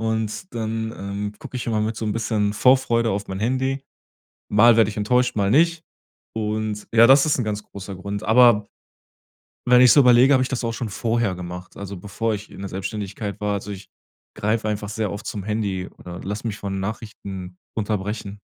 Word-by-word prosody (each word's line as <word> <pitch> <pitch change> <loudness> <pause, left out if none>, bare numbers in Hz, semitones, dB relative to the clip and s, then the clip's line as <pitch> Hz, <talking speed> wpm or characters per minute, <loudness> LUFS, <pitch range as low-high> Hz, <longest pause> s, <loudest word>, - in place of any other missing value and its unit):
Und 110 - -2
dann 110 0 -3
ähm, 100 +1 -4
guck - - -11
ich 125 - -4
immer 110 -2 0
mit 110 +1 -1
so 110 - -4
'n 105 - 0
bisschen 105 -2 0
Vorfreude 115 -1 +3
auf 100 +1 -2
mein 95 +1 -4
Handy. 130 +3 0 0.7
Mal 115 +2 +6
werde 110 -2 +4
ich 105 - -10
enttäuscht, 125 +3 +1
mal 100 -1 +2
nicht. 165 +5 +3 0.5
Und 110 -1 -2
ja, 115 +1 +7
das 135 +3 +6
ist 150 - +2
'n 125 - 0
ganz 105 0 -3
großer 100 -1 -9
Grund. 100 +2 -5
Aber 115 -2 +5 1.0
wenn 125 0 +6
ich 125 -2 +8
so 145 - +7
überlege, 125 +2 +6
hab 130 - +4
ich 130 - 0
das 125 -2 -3
auch 115 - -1
schon 115 0 -4
vorher 115 0 0
gemacht, 90 0 -8
also 100 -1 -6
bevor 105 +4 -2
ich 105 +1 -8
in - - -11
der 100 - -5
Selbstständigkeit 100 +1 -5
war. 105 0 0
Also, 100 +1 -5
ich 100 -1 -8 0.5
greife 110 +1 0
einfach 105 -1 -3
sehr 105 -3 -2
oft 100 0 -7
zum 100 -2 -4
Handy 100 -4 -2
oder 90 0 -8
lasse 105 +4 -4
mich 105 -2 -3
von 95 -1 -4
Nachrichten 95 -3 -6 0.2
unterbrechen. 105 -1 -3
105 Hz, 200 wpm, -23 LUFS, 100-115 Hz, 1.0 s, ich